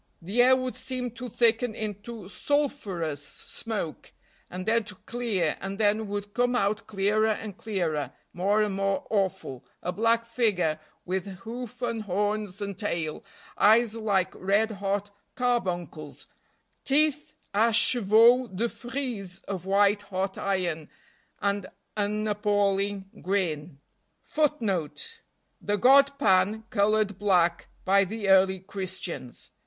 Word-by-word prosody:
The 200 +8 +1
air 255 +1 +7
would 255 -1 -3
seem 255 -2 -3
to 245 +2 -7
thicken 230 0 +2
into 215 -1 -6
sulfurous 200 - -1
smoke, 210 -9 -5 0.4
and 185 +1 -6
then 230 +1 +2
to 210 - -7
clear, 210 -9 -1
and 195 0 -4
then 215 0 +2
would 205 0 -5
come 245 0 +1
out 210 0 0
clearer 210 +1 +2
and 215 -2 -2
clearer, 165 - -2 0.2
more 200 +4 +2
and 210 -2 -1
more 195 0 0
awful, 190 - -1 0.2
a 180 - -1
black 230 +3 +2
figure 205 -10 +1 0.3
with 185 +1 -2
hoof 240 +1 -7
and 230 -2 -1
horns 205 0 -1
and 200 -1 -5
tail, 165 -7 -2 0.4
eyes 220 +1 +5
like 200 -4 0
red 205 +4 +1
hot 200 0 -2 0.2
carbuncles, 175 - -2 0.6
teeth 300 +1 +2 0.2
a 225 +3 +4
chevaux 235 +2 +5
de 225 +4 -2
frise 240 -8 -5
of 190 -2 -6
white 200 +1 +4
hot 190 -1 -3
iron, 175 -6 -2 0.5
and 200 -1 0 0.3
an 210 +1 -1
appalling 205 -1 +1 0.2
grin.* 170 -6 -1 0.3
* - - -25
The 290 - -2
god 280 +4 +6
Pan 200 +1 +3
colored 205 -1 +2
black 175 -4 +2 0.2
by 195 +1 +5
the 205 +1 -3
early 190 -1 +5
Christians. 185 -9 -6
205 Hz, 125 wpm, -27 LUFS, 190-230 Hz, 0.6 s, air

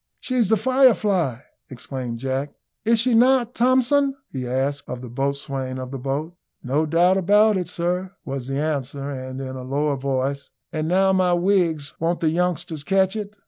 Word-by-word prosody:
"She's 245 -6 0
the 220 - +4
Firefly," 210 - +2 0.3
exclaimed 125 -1 -5
Jack; 135 +3 -3 0.3
"is 230 +1 +4
she 235 +2 +3
not, 245 +1 +4
Thomson?" 260 +3 +3
he 130 -2 -5
asked 135 +3 -2
of 125 -1 -5
the 125 -2 -9
boatswain 135 0 -3
of 130 0 -6
the 135 - -5
boat. 140 +6 -3 0.3
"No 145 +5 0
doubt 175 +4 +3
about 210 +3 +4
it, 180 -3 -2
sir," 180 +2 -2
was 135 -2 -5
the 135 0 -2
answer; 140 -2 -2
and 130 -1 -6
in 130 -1 -5
a 130 - -6
lower 140 +2 -1
voice, 135 +1 -2 0.2
"And 155 -1 -2
now, 190 +2 +3
my 185 -1 +3
wigs, 175 -5 +1
won't 170 +2 0
the 160 - +2
youngsters 175 -2 -1
catch 190 +3 +2
it!" 210 -1 -6
155 Hz, 175 wpm, -23 LUFS, 135-195 Hz, 0.3 s, the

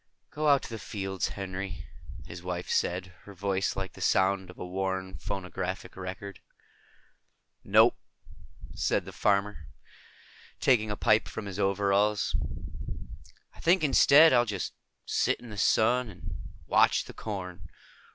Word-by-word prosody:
"Go 155 +1 -1
out 140 -2 +5
to - - -7
the 115 - -5
fields, 95 -1 -3
Henry," 95 -3 -5 0.4
his 85 +1 -9
wife 90 0 -4
said, 90 +1 -1
her 100 - -11
voice 95 +1 -1
like 95 -1 -4
the - - -12
sound 95 0 +2
of 90 - -12
a - - -6
worn 95 0 -3
phonograph 95 -4 -4
record. 95 +1 -7 1.2
"No," - - +6 0.8
the - - -1
farmer 100 0 +1 1.0
said, - - -44
taking 110 -5 +3
a 105 - -3
pipe 110 0 +3
from 105 - -6
his 100 0 -6
overalls. 100 +1 +2 1.2
"I - - -18
think 175 +1 +3
instead, 150 +1 +7
I'll 120 -1 +5
just 100 -5 -3 0.3
sit - - +1
in 120 -2 -11
the 105 - -8
sun 120 +4 +3
and 90 -2 -8 0.3
watch - - +4
the - - -10
corn. 90 -5 -6
100 Hz, 140 wpm, -29 LUFS, 95-105 Hz, 1.2 s, instead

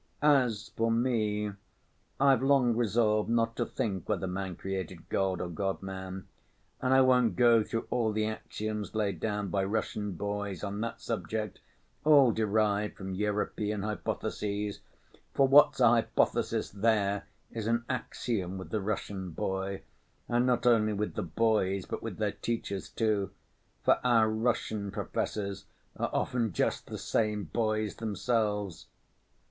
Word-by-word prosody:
As 125 -8 +3
for 115 0 0
me, 110 -3 +1 0.7
I've 135 -3 +5
long 135 -4 +4
resolved 110 -1 +2
not 115 0 +1
to 120 - 0
think 100 -9 -3
whether - - 0
man 95 0 -3
created 95 -2 -5
God 95 -2 0
or 90 - -2
God 95 +3 -3
man. 95 0 -6 0.5
And 130 - +1
I 130 0 +7
won't 125 -6 +4
go 115 +1 +6
through 115 +1 -3
all 115 -3 +1
the 110 0 0
axioms 110 -1 -4
laid 105 -2 0
down 105 -2 -2
by 95 +1 0
Russian 105 0 -2
boys 100 +1 -4
on 100 +1 -3
that 115 0 -4
subject, 110 -2 -3 0.4
all 140 -4 +7
derived 105 -1 +1
from 95 0 -5
European 105 +1 -1
hypotheses; 105 -1 -3 0.6
for 135 - +5
what's 140 +1 +6
a 120 - +7
hypothesis 115 0 +2
there, 100 -2 +1 0.2
is 110 -2 -4
an 115 +1 +1
axiom 110 -6 -2
with 95 - -8
the 110 - 0
Russian 95 -2 -3
boy, 95 +3 -3 0.4
and 120 +1 +2
not 125 -1 +1
only 110 -3 +4
with 105 +1 -2
the - - -2
boys 100 -4 +1
but - - -5
with - - -5
their - - 0
teachers 110 -4 -4
too, 105 -4 0 0.5
for - - +4
our 115 -3 +4
Russian 110 -2 -1
professors 100 0 -3 0.3
are - - -1
often 115 -6 0
just - - 0
the - - -5
same 105 -2 0
boys 110 +3 -1
themselves. 105 -3 -1
105 Hz, 145 wpm, -30 LUFS, 100-115 Hz, 0.7 s, I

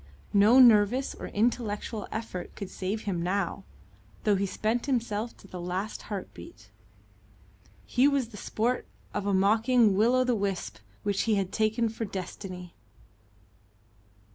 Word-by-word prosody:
No 210 +5 +6
nervous 245 +1 +6
or - - -7
intellectual 220 -1 -1
effort 215 -5 -5
could 200 -3 -7
save 195 +3 -3
him 185 -5 -2
now, 195 +2 -1 0.6
though 210 -3 +3
he 195 +1 0
spent 225 +6 -1
himself 230 -3 -1
to - - -16
the 180 -2 -7
last 185 +5 -3
heartbeat. 205 - -8 1.1
He 255 +3 +3
was 275 -5 +1
the 225 - -12
sport 235 +5 -1 0.3
of 205 -1 -2
a 200 - +1
mocking 220 +2 +4
Will 225 +5 +4
o' 255 - +4
the 250 -1 +1
Wisp 195 - -2 0.2
which 200 -1 0
he 215 - +4
had 195 -2 -1
taken 220 +1 +1
for 225 +1 -4
Destiny. 185 -2 -7
210 Hz, 140 wpm, -28 LUFS, 195-235 Hz, 1.1 s, No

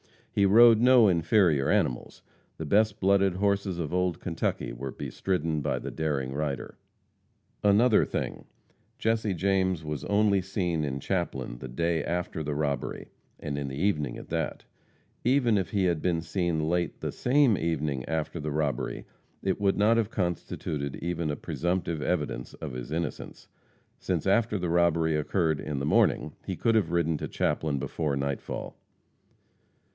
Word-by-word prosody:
He 100 - +3
rode 115 +2 +7
no 125 -2 +6
inferior 85 -4 +3
animals - - 0 0.3
the 80 - -5
best 105 +6 +2
blooded 100 -1 +3
horses 100 -1 0
of 85 -2 -3
old 90 -2 0
Kentucky - - -2
were 65 +3 -5
bestridden 80 +1 -2
by 70 - -1
the - - -5
daring 70 -5 -2
raider. 70 -2 -4 0.8
Another 105 +3 +5
thing: - - -4 0.5
Jesse 110 -3 0
James 95 -2 +1
was 75 -2 -4
only 100 -1 +3
seen 90 -4 -1
in 70 -1 -3
Chaplin 65 -10 -3
the 65 - -7
day 80 +5 -1
after 90 -2 -3
the 75 -1 -3
robbery, 70 -2 -2 0.3
and 70 -1 -4
in 70 - -3
the 65 - -5
evening 75 -2 0
at - - -11
that; - - -3 0.6
even 125 -2 +3
if 95 -3 -1
he 100 -2 0
had 85 -4 +1
been 85 -2 0
seen 85 -2 -1
late 85 +1 -1
the - - -2
same 130 -3 +3
evening 75 -5 -1
after 80 +1 -3
the 75 0 -3
robbery, 70 -5 -2 0.4
it 95 -1 0
would 100 -1 +2
not 110 +3 +4
have 110 -2 +1
constituted 80 -7 -3
even 85 -2 -3
a 75 - -1
presumptive 85 -2 -2
evidence 60 -4 -2
of - - -6
his 60 +2 -7
innocence, 85 +2 -5 0.5
since 85 -4 -2
after 110 +2 +2
the 90 -2 -2
robbery 85 -2 +2
occurred 80 0 0
in 75 -2 -4
the 70 - -2
morning 75 0 +2 0.2
he - - -2
could 115 - +1
have 100 -7 +2
ridden 85 -2 +1
to - - -4
Chaplin 75 -1 -1
before 75 +1 -2
nightfall. 70 0 -4
85 Hz, 160 wpm, -28 LUFS, 75-100 Hz, 0.8 s, rode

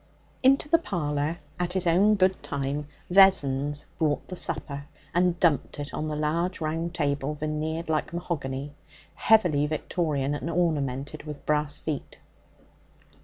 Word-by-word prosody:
Into 275 +2 +4
the 330 +2 +4
parlour, 155 - -1 0.2
at 180 0 -1
his 190 -1 0
own 195 +5 +5
good 190 -1 +2
time, 140 +1 -3 0.2
Vessons 145 -7 +4
brought 150 -2 0
the 185 - -5
supper, 140 -4 -3 0.3
and 175 0 +2
dumped 155 -7 +2
it 145 0 -5
on 155 - -2
the 155 - -2
large 165 +5 0
round 165 +2 -2
table, 145 -2 -1
veneered 155 +2 -3
like 155 -1 0
mahogany, 145 -5 -4 0.4
heavily 175 -10 +4
Victorian 150 -2 -1
and 145 +3 -3
ornamented 150 -4 -1
with 150 -2 -8
brass 150 -1 0
feet. 150 -4 -5
155 Hz, 135 wpm, -27 LUFS, 145-175 Hz, 0.4 s, own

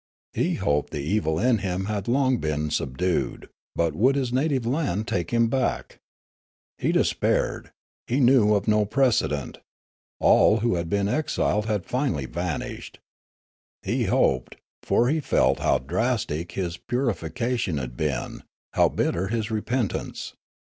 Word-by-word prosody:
He - - 0
hoped 75 0 0
the - - -4
evil 80 -2 0
in 120 +3 +2
him 95 0 -2
had 105 -2 -3
been 120 - +1
long 80 - 0
subdued; 85 +7 -1 0.3
but 85 -2 +1
would 125 - +3
his 130 -3 -1
native 135 -2 +1
land 120 - -1
take 85 -3 -1
him 115 -1 +3
back? 130 +2 -2 0.8
He - - +1
despaired; - - 0 0.4
he 125 +4 0
knew 120 -5 +5
of 100 - -1
no 105 0 +4
precedent; 110 - 0 0.6
all 110 +1 +5
who 120 +1 +2
had 85 -2 -2
been 100 +1 +1
exiled 105 -5 0
had 105 -4 -1
finally 125 - -1
vanished. 85 +2 -5 0.9
He - - 0
hoped, - - +1 0.3
for 120 - +2
he 155 +4 +1
felt 150 - +2
how - - +2
drastic 85 - -2
his 90 -2 -3
puri 125 -1 -1
fication 95 - -2
had 60 -2 -6
been, 75 0 -3 0.3
how - - +4
bitter 90 +3 -1
his 110 +1 -2
repentance. 110 0 -2
105 Hz, 140 wpm, -25 LUFS, 85-125 Hz, 0.9 s, knew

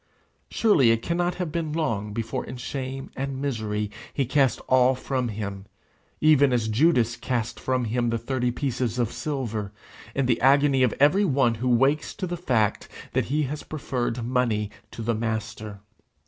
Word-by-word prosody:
Surely 180 - +4
it 115 0 +2
cannot 175 +1 0
have 180 -4 -3
been 160 -2 -2
long 110 -11 -1
before 115 +1 -3
in 125 - -8
shame 135 +1 -5
and 135 0 -3
misery 110 -6 -2 0.2
he 140 - 0
cast 135 0 +2
all 130 0 +4
from 130 -1 -2
him, 100 -3 -5 0.5
even 145 -3 +5
as 120 -3 +1
Judas 120 -1 +3
cast 120 -3 -3
from 130 -2 0
him 120 +1 0
the 115 - 0
thirty 125 +1 -1
pieces 125 -2 -2
of 120 -2 0
silver, 115 -9 -3 0.4
in 135 - +1
the 120 -2 +1
agony 140 +1 +4
of 125 -4 +3
every 150 +9 +5
one 135 - +3
who 125 - +1
wakes 135 +5 +2
to 195 - -3
the 175 -1 -3
fact 125 - 0 0.2
that - - +1
he 150 +4 0
has 145 +2 -4
preferred 125 -5 -3
money 115 -4 0 0.2
to 115 - -7
the 115 +1 +1
Master! 110 -2 -4
125 Hz, 170 wpm, -25 LUFS, 115-140 Hz, 0.5 s, even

